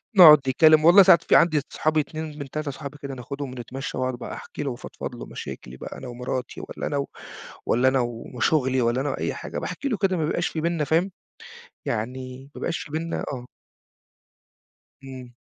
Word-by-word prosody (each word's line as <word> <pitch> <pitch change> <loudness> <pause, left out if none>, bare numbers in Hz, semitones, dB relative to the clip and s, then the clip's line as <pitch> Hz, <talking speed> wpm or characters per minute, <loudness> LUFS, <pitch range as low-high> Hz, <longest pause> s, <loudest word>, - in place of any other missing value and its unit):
نقعد 160 -5 +11
نتكلّم، 155 +4 +4
والله 190 +3 +9
ساعات 170 -3 +6
في - - +3
عندي 155 -4 +5
أصحابي 155 0 +1
2، 155 0 -5
من 140 -2 -6
3، 150 -1 -3
صحابي 145 +1 -8
كده 140 -1 -5
ناخدهم 135 +2 -6
ونتمشى 125 +1 -6
واقعد 130 0 -1
بقى 120 - -7
أحكي - - -7
له 135 - -2
وافضفض 120 - -7
له - - -8
مشاكلي 65 +1 -8
بقى - - -8
أنا - - -8
ومراتي 125 +1 -4
والّا - - -5
أنا 145 - -1
و 140 - -1 0.6
والّا 125 +3 +3
أنا 130 0 +3
و 120 -1 -4
وشُغلي 130 0 +2
والّا 120 +3 +1
أنا 145 - -1
وأي - - -2
حاجة، - - -5
باحكي 280 - -4
له 220 - 0
كده 190 -3 +1
ما 155 - 0
بيبقاش 175 +2 0
في 160 - -3
بيننا 170 -2 0
فاهم؟ 165 +7 +1 0.7
يعني 130 +4 -4
ما - - -8
بقاش 165 - -1
في 145 - -8
بيننا 165 +2 -2
آه. 125 -1 -6 1.6
إمم. 130 -2 -10
140 Hz, 195 wpm, -24 LUFS, 130-155 Hz, 1.6 s, نقعد